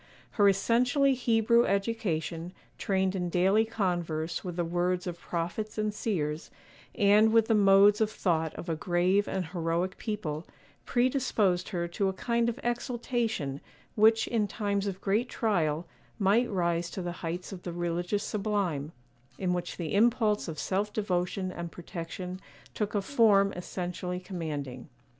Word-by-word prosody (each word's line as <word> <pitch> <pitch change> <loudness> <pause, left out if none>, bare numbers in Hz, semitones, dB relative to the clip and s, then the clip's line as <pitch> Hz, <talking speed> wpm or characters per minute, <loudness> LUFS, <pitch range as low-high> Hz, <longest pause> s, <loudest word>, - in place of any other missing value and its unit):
Her 205 -3 +5
essentially 245 +7 +3
Hebrew 235 -1 +3
education, 185 -5 -1 0.3
trained 190 -1 0
in 180 -2 -1
daily 190 +5 +3
converse 175 -6 -2
with 180 -2 -5
the 175 -1 -1
words 175 +1 0
of 175 -2 -5
prophets 175 +7 -4
and 215 -1 0
seers, 160 -8 -2 0.5
and 210 +2 +5
with 225 -1 +4
the 225 - +3
modes 200 0 +6
of 215 - +3
thought 165 -6 0
of - - -7
a 165 - 0
grave 180 +4 +1
and 190 -2 -2
heroic 170 +2 -2
people, 175 -8 -4 0.4
predisposed 240 -8 +1
her 175 -4 -2
to 195 +3 0
a - - -3
kind 235 +4 0
of 235 +3 -5
exaltation 235 - -2 0.3
which, 220 +1 +4
in 220 -3 +1
times 200 -2 -1
of 195 -1 -4
great 215 +5 +1
trial, 170 -7 0 0.3
might 215 +4 +3
rise 170 -3 0
to 185 - -5
the 175 - -3
heights 175 +3 -4
of 190 -2 -7
the 175 - -5
religious 175 +4 -1
sublime, 195 -9 -2 0.4
in 180 -2 0
which 175 -1 -4
the 165 -4 -4
impulse 215 -1 +3
of 160 -2 -5
self 195 +7 -1
devotion 185 -2 -1
and 170 -2 -6
protection 180 +1 -6 0.3
took 210 -1 -2
a 200 - +1
form 200 -5 +4
essentially 180 0 -4
commanding. 150 -9 -5
190 Hz, 150 wpm, -29 LUFS, 175-215 Hz, 0.5 s, modes